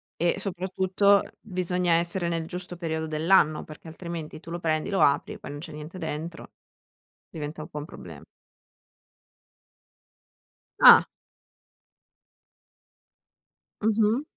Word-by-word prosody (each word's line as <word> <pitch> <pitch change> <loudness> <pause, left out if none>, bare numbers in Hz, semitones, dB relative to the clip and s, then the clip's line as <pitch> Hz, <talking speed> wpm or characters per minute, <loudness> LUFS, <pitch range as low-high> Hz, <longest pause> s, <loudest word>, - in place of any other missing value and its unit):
e 175 +3 0
soprattutto 190 +1 +2 0.2
bisogna 180 -3 -1
essere 170 +1 +1
nel 165 -1 -2
giusto 180 +1 -5
periodo 160 -2 -3
dell'anno, 155 0 +3
perché 155 +1 -12
altrimenti 160 -2 -7
tu 165 +1 -11
lo 175 - -4
prendi, 155 +3 -1
lo 195 - +1
apri, 140 0 +3
e - - -11
poi - - -9
non 145 0 -7
c'è 165 +1 -9
niente 150 +4 -9
dentro, 160 0 -6 0.8
diventa 155 0 -6
un - - -7
po' 150 - -7
un 145 - -6
problema. - - -11 2.6
Ah! - - +10 2.8
Mh-mh. 220 +3 +2
170 Hz, 115 wpm, -26 LUFS, 155-185 Hz, 2.8 s, Ah